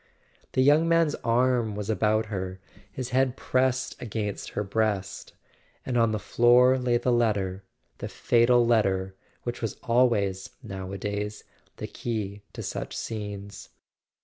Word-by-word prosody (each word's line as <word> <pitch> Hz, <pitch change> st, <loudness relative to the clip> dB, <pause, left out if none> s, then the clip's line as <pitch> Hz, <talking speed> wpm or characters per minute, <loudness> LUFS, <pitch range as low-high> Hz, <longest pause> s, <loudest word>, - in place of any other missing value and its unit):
The 130 Hz, -, +3 dB
young 150 Hz, +4 st, +5 dB
man's 165 Hz, -2 st, +3 dB
arm 120 Hz, -2 st, +2 dB
was 105 Hz, -1 st, -4 dB
about 110 Hz, 0 st, +1 dB
her, 95 Hz, -1 st, -4 dB, 0.3 s
his 125 Hz, +3 st, -5 dB
head 130 Hz, 0 st, +2 dB
pressed 130 Hz, 0 st, 0 dB
against 105 Hz, -3 st, -4 dB
her 105 Hz, -, +1 dB
breast; 100 Hz, -1 st, -2 dB, 0.5 s
and 125 Hz, -, -2 dB
on 115 Hz, -2 st, +3 dB
the 110 Hz, -, 0 dB
floor 125 Hz, +4 st, +4 dB
lay 125 Hz, -1 st, +2 dB
the 125 Hz, -, 0 dB
letter, 100 Hz, -5 st, 0 dB, 0.4 s
the -, -, -4 dB
fatal 120 Hz, 0 st, +3 dB
letter 95 Hz, -5 st, +1 dB, 0.3 s
which 120 Hz, 0 st, -4 dB
was 115 Hz, -3 st, -3 dB
always, 110 Hz, -6 st, +2 dB
nowadays, 100 Hz, +1 st, -5 dB, 0.3 s
the -, -, -5 dB
key 105 Hz, -4 st, -4 dB
to -, -, -6 dB
such -, -, -5 dB
scenes. 105 Hz, -2 st, -6 dB
110 Hz, 135 wpm, -27 LUFS, 100-125 Hz, 0.5 s, young